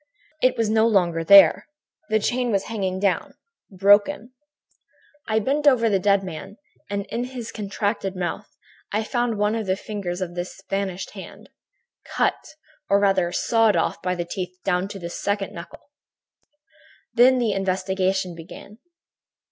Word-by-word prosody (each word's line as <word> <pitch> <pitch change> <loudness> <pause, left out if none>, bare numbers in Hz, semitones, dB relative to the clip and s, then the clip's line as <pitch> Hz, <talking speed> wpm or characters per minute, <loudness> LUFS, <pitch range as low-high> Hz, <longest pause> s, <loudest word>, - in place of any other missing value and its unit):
It 255 - +3
was 225 -1 +1
no 220 +1 +3
longer 175 -6 +1
there. 200 +4 +7 0.4
The 220 - +3
chain 245 +3 -1
was 200 -2 +1
hanging 190 -4 -3
down, 195 -2 -1 0.3
broken. 205 +6 +3 0.9
"I 220 - +1
bent 280 +7 0
over 230 -5 +4
the 195 - +2
dead 200 0 +2
man 190 +3 -8 0.3
and, 200 0 -3
in 240 +1 -2
his 250 -3 -7
contracted 200 -1 -3
mouth, 180 +3 -4 0.4
I 215 +2 0
found 240 -1 -1
one 210 +1 +1
of 225 -3 -3
the 185 - +1
fingers 195 -3 -5
of 180 -2 -4
this 175 +2 -6
vanished 195 -1 -3
hand, - - -12 0.5
cut - - -2 0.3
or 200 - +4
rather 195 -3 +2
sawed 225 +3 +2
off - - -1
by 180 0 -1
the 175 -1 -3
teeth 180 0 -6
down 180 0 0
to 200 - -8
the 170 -2 -7
second 200 +1 -2
knuckle. 170 +10 -11 1.2
"Then 255 +2 +5
the 235 -4 +1
investigation 190 -1 -1
began. 170 +6 -12
200 Hz, 150 wpm, -23 LUFS, 185-220 Hz, 1.2 s, there